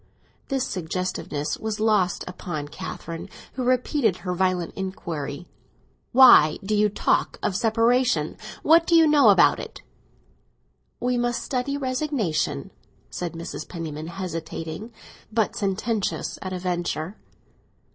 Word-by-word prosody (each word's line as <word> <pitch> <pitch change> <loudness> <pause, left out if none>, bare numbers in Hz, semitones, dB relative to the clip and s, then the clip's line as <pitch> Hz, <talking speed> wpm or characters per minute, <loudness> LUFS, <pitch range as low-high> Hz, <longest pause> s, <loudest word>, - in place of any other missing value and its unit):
This 270 -2 0
suggestiveness 175 - -3
was 220 -1 -3
lost 210 -5 +2
upon 165 -5 -5
Catherine, 170 -1 -7 0.2
who 255 - -3
repeated 250 - +2
her 180 -2 -3
violent 180 -1 0
inquiry. 170 -5 -5 0.6
"Why 240 - +8
do 215 - -1
you 210 0 +3
talk 205 - 0
about 190 - 0
separation; 230 -6 +2 0.3
what 330 +2 +5
do 340 - +4
you 325 -1 +7
know 290 -6 +6
about 195 -3 +5
it?" - - -9 1.2
"We 250 0 0
must 240 0 -1
study 275 +2 -2
resignation," 255 - -1 0.4
said 175 -2 -4
Mrs. 165 0 -7
Penniman, 160 -3 -5
hesitating, 170 +2 -5 0.4
but 220 -1 +1
sententious 205 +1 -2
at 185 - -5
a 185 - -2
venture. 175 0 -3
195 Hz, 120 wpm, -24 LUFS, 170-245 Hz, 1.2 s, Why